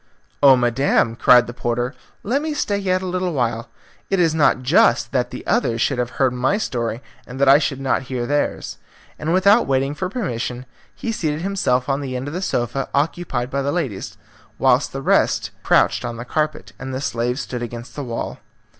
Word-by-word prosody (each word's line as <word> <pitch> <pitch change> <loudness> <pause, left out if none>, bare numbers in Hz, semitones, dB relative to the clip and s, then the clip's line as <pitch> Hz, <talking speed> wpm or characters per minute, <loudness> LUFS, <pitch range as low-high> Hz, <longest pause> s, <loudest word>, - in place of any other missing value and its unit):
"Oh, 140 -2 +8
madam," 120 -1 +2
cried 125 +1 +6
the 120 - -7
porter, 120 +1 -2 0.3
"let 260 +7 0
me 310 -1 -3
stay 205 -8 0
yet 185 -1 0
a - - -3
little 180 -1 -2
while. 120 -3 -1 0.4
It 195 - +1
is 165 -3 +3
not 150 -4 +3
just 120 -4 +3
that 125 -2 0
the - - -8
others 205 - +1
should 130 +1 +1
have 120 0 -3
heard 130 -2 +2
my 130 +10 +1
story 120 - -3 0.2
and 125 +1 -8
that 140 - +3
I 140 +2 +8
should 135 -3 -2
not 135 -1 0
hear 125 -2 -2
theirs," 145 +3 -2 0.4
and 155 +2 -2
without 200 +6 +4
waiting 135 +1 +1
for 180 +5 -3
permission 125 - -3 0.3
he 230 - -3
seated 155 -7 -2
himself 170 -10 0
on 140 0 0
the 130 -2 -4
end 125 +2 -4
of 145 - -5
the 180 - -3
sofa 125 -5 -2
occupied 140 -4 -1
by 140 - 0
the 140 +1 -1
ladies, 140 - -3 0.4
whilst - - +3
the - - -6
rest - - +2
crouched - - +3
on 115 - -4
the 120 - -6
carpet, 150 -10 -2
and 135 0 -6
the - - -2
slaves 125 0 -1
stood 125 -1 -5
against 120 -1 -7
the 145 - -4
wall. 115 -3 -5
135 Hz, 200 wpm, -21 LUFS, 120-165 Hz, 0.4 s, Oh